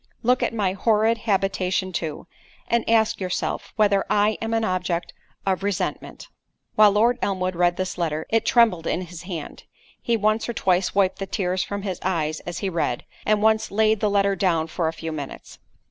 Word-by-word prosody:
Look 250 +2 +3
at - - +1
my 205 -5 0
horrid 220 +2 +2
habitation, 190 -1 0
too,—and 170 +8 -4
ask 220 -2 +2
yourself—whether 200 +2 0
I 210 +1 +3
am 225 0 -2
an 225 - +1
object 180 -3 -2 0.3
of 190 -1 0
resentment?" 200 -2 -3 0.5
While 210 -2 +6
Lord 235 +4 +3
Elmwood 185 -2 -1
read 175 0 +2
this 185 -1 -3
letter, 160 -2 -1
it 225 0 +2
trembled 225 -9 +3
in 175 - 0
his 175 -1 -9
hand: 165 -5 -7 0.4
he 235 -1 +1
once 215 +2 +1
or - - -1
twice 185 -3 +1
wiped 195 -2 +2
the 195 - -4
tears 185 -2 -1
from 200 -1 -5
his 190 -3 -3
eyes 160 -4 -1
as 175 -1 -4
he - - +1
read, 165 -9 -2 0.2
and 210 0 +2
once 220 0 +3
laid 215 +1 +2
the 210 - +1
letter 200 -1 +2
down 170 -4 +1
for 165 +1 -2
a 160 - -1
few 165 0 -6
minutes. 145 -3 -8
195 Hz, 180 wpm, -23 LUFS, 175-215 Hz, 0.5 s, While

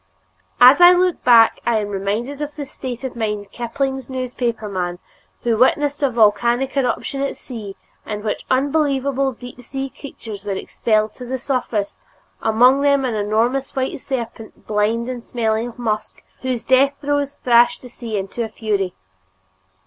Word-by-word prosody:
As 255 +7 +8
I 350 +1 +10
look 360 -1 +1
back, 230 -2 +6
I 235 -2 +2
am 210 -1 -2
reminded 210 +8 -3
of 295 0 -4
the 295 -2 -5
state 255 -2 -7
of 260 -2 -5
mind 210 -3 -2
of 195 - -30
Kipling's 265 +2 -3
newspapermen 225 -8 -3 0.5
who 235 -2 +2
witnessed 290 +4 +2
a 280 - +3
volcanic 235 +3 +2
eruption 275 +1 -1
at 275 - -2
sea, 215 -6 -8 0.3
in 210 -1 -5
which 215 - -2
unbelievable 275 -1 +1
deep 245 0 -11
sea 270 +2 -5
creatures 220 -8 -9
were 205 -1 -2
expelled 215 +2 0
to 250 - -9
the 260 +2 -3
surface, 245 -6 -2 0.4
among 250 +5 +4
them 280 -1 +3
an 245 - -1
enormous 225 +6 0
white 265 0 -2
serpent, 230 -4 -6
blind 215 +3 0
and 250 -2 -5
smelling 225 -1 -1
of 240 - -10
musk, 215 -3 -3 0.2
whose 255 -3 -2
death 265 +3 +4
throes 285 -1 -1
thrashed 240 0 +4
the - - -8
sea 230 -3 -5
into 195 +4 -3
a 225 - -4
fury. 205 -4 -2
240 Hz, 160 wpm, -20 LUFS, 220-270 Hz, 0.5 s, I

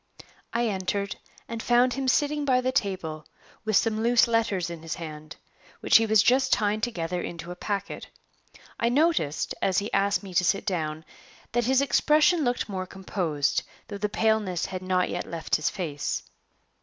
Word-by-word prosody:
I 235 +1 0
entered, 200 0 -2 0.3
and 230 -1 -5
found 245 +2 +3
him 270 -1 -3
sitting 295 +3 +2
by 260 -3 +3
the 255 +1 0
table, 185 - -2 0.4
with 215 -1 +1
some 220 +1 +2
loose 235 +1 +4
letters 210 -7 0
in 170 -2 -7
his 165 0 -4
hand, 155 -2 -8 0.4
which - - +6
he 225 0 +1
was 220 -1 +5
just 260 +2 +3
tying 210 0 +2
together 180 -7 -2
into 170 0 -6
a - - -6
packet. 200 +1 -4 0.7
I 235 - +2
noticed, 275 - +1
as 190 - +1
he 205 +1 -1
asked 200 +1 +2
me 190 -2 -9
to 180 - +3
sit 195 +3 +1
down, 155 -4 -2 0.5
that 240 0 +1
his 260 +2 +3
expression 305 +4 +3
looked 245 -1 0
more 185 -3 -4
composed, 180 -7 -1 0.3
though 200 -1 -6
the 210 +1 -1
paleness 215 -5 +1
had 185 -1 -5
not 185 -1 +1
yet - - -4
left 165 -1 -1
his 155 - 0
face. 160 -8 -3
200 Hz, 175 wpm, -26 LUFS, 180-240 Hz, 0.7 s, which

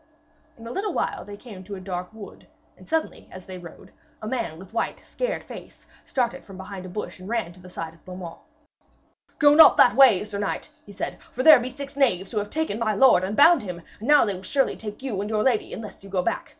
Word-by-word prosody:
In 230 - -12
a 230 - -6
little 400 +8 -2
while - - -2
they 205 0 -10
came 205 -5 -11
to 200 +2 -7
a - - -8
dark 180 0 -5
wood, 220 -2 -12 0.3
and - - -18
suddenly 320 0 -2
as 185 -1 -11
they 185 -1 -8
rode, 170 -2 -13 0.3
a 215 - -7
man 220 -10 -3
with 190 +4 -13
white 230 - -2
scared - - -3
face - - -12 0.2
started 245 -3 -1
from 195 -2 -12
behind 190 0 -8
a - - -9
bush 190 0 -6
and 185 +2 -10
ran 225 -7 -2
to 180 - -18
the 180 0 -13
side 165 -2 -6
of 165 - -23
Beaumains. 180 -2 -9 1.0
'Go 290 -1 +6
not 320 +2 +8
that 245 - +6
way, 245 -8 +6
sir 205 -1 -6
knight,' 205 - -3 0.2
he - - -11
said, 200 - -5
'for 255 - -5
there 310 -3 +9
be 245 +1 -4
six 275 +2 -8
knaves 195 -10 +1
who 215 - 0
have 205 0 -4
taken 315 -8 -2
my 215 -2 0
lord 240 -4 +5
and 200 +3 -3
bound 335 +4 +7
him, 180 -4 -7 0.2
and 220 - -7
now 295 -3 +6
they 205 - -1
will 185 - -8
surely 270 +8 0
take 210 +3 -8
you 220 -8 -2
and 205 - -4
your 215 -1 0
lady 245 -5 +1
unless 210 -3 -9
you 195 - -11
go 185 -2 0
back. - - -2
210 Hz, 245 wpm, -24 LUFS, 185-255 Hz, 1.0 s, there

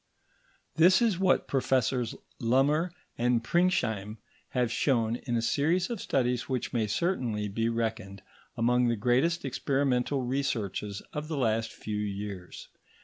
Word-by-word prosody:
This 180 +3 +6
is 220 -7 +2
what 190 -1 +2
Professors 130 -3 +1 0.2
Lummer 140 +8 +2 0.3
and 120 -1 +2
Pringsheim 115 - +1 0.3
have 125 -3 0
shown 115 -3 +1
in 120 - 0
a 115 - -1
series 170 - +1
of 230 - -4
studies 125 -2 0
which 130 -3 -2
may 115 -3 +1
certainly 115 - -1
be 115 +3 -1
reckoned 110 -4 -3 0.3
among 125 +1 +3
the 120 - +2
greatest 130 +10 +1
experimental 135 0 0
researches 115 -6 -2
of 150 +1 -4
the 155 -2 -3
last 115 -3 0
few 105 -1 -5
years. 100 -3 -6
125 Hz, 135 wpm, -29 LUFS, 110-140 Hz, 0.3 s, This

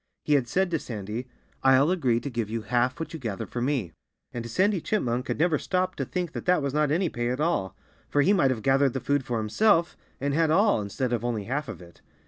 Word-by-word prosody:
He 150 - +1
had 135 -4 +2
said 190 +7 0
to 165 - +1
Sandy: 110 +1 -5 0.3
"I'll 135 +4 +5
agree 130 -11 +1
to 140 - -4
give 115 -3 -2
you 115 0 -3
half 120 +5 0
what 165 - -5
you 160 - -5
gather 110 -7 -4
for 120 - -5
me." 125 - -1 0.4
And 115 -1 -5
Sandy 190 - +2
Chipmunk 125 - -1
had - - -2
never 160 -1 +2
stopped 185 -1 -1
to - - 0
think 180 -3 -3
that - - -6
that 180 -4 +3
was 140 -1 -2
not 150 -1 +2
any 175 +5 +1
pay 120 -5 -2
at 125 +2 -2
all. 150 - 0 0.3
For 145 - +3
he 195 - +4
might 170 -9 +3
have 115 -5 -2
gathered 135 -1 +3
the 130 - -2
food 140 +1 0
for 120 -2 -2
himself, 170 - +2 0.2
and 140 +1 -1
had 160 +1 +2
all, 200 - +3
instead 120 +5 -2
of 115 -1 -1
only 115 -4 -1
half 140 +7 -3
of - - -8
it. 85 0 -17
135 Hz, 245 wpm, -26 LUFS, 120-165 Hz, 0.4 s, I'll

